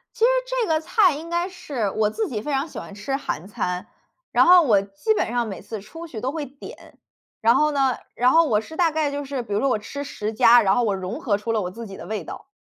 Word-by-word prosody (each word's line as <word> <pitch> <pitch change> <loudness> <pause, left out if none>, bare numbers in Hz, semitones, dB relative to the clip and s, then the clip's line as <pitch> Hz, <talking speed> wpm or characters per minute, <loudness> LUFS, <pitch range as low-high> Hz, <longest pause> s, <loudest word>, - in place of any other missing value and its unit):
其 - - -15
实 - - +6 0.2
这 - - -1
个 315 -1 +2
菜 365 +1 +3
应 320 +4 -8
该 345 +1 0
是 295 - -3
我 210 +1 +1
自 440 - -2
己 215 -5 -4
非 295 - -3
常 275 +2 0
喜 - - -9
欢 - - -8
吃 210 +7 -4
韩 190 - -4
餐， 180 -2 -3 0.5
然 - - +5
后 360 0 +8
我 215 -10 +3
基 200 - -1
本 - - 0
上 240 -1 0
每 195 -4 -6
次 210 +1 -7
出 325 +12 -10
去 240 -9 -7
都 260 +4 -2
会 310 -1 -3
点。 275 +1 -13 0.4
然 230 +2 +4
后 300 +3 +3
呢 270 -3 +2 0.2
然 245 +1 +3
后 330 +1 +6
我 215 -7 +2
是 320 +8 -11
大 340 -1 +3
概 310 -2 0
就 285 0 -4
是 270 -2 -4
比 210 -3 -5
如 205 - +1
说 275 - +2
我 220 - +1
吃 280 +7 -7
10 215 -6 -4
家， 230 +2 +6
然 195 -2 +3
后 245 - +2
我 205 -3 +1
融 190 -1 -5
合 205 - +1
出 225 +2 -3
了 220 - +1
我 180 - -4
自 230 +4 -8
己 195 -2 -9
的 - - -9
味 215 -3 -3
道。 - - -9
250 Hz, 290 characters per minute, -23 LUFS, 210-315 Hz, 0.5 s, 后